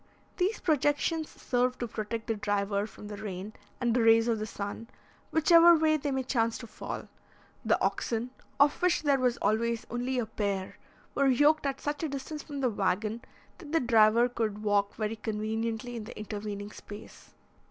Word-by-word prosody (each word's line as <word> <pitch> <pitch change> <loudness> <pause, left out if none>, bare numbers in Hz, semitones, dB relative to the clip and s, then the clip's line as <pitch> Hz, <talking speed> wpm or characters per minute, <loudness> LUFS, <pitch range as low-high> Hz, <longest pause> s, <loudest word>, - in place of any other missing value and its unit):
These 390 +4 0
projections 310 +1 +1
serve 250 0 -1
to 240 - -3
protect 220 +1 -4
the 225 - 0
driver 205 -1 -1
from 210 - -11
the 205 0 -7
rain 200 0 -6 0.3
and 240 -2 +1
the 245 - +2
rays 225 0 +5
of 230 -2 +1
the 215 - -3
sun, 205 +3 -6 0.4
whichever 335 +1 +7
way 310 0 +3
they 295 -1 -2
may 265 -1 -1
chance 230 -3 0
to 240 - -8
fall. 220 - -7 0.6
The - - +2
oxen, 235 +2 -1 0.3
of 285 +4 +4
which 360 -3 +2
there 280 -2 +3
was 250 -1 +1
always 230 +2 +1
only 245 +2 -2
a 245 - 0
pair, 200 -3 -3 0.3
were 275 - +2
yoked 290 +3 +4
at 275 - -3
such 290 0 -3
a 320 - -1
distance 280 +2 -5
from 285 -2 -6
the 255 - +2
waggon, 210 +3 -1 0.4
that 315 -4 -10
the 325 - +4
driver 230 -1 +5
could 215 -3 -3
walk 205 -1 +1
very 220 0 -2
conveniently 220 +2 -3
in 225 -2 -5
the 230 - -10
intervening 210 -1 -5
space. 210 +1 -12
230 Hz, 180 wpm, -29 LUFS, 215-275 Hz, 0.6 s, whichever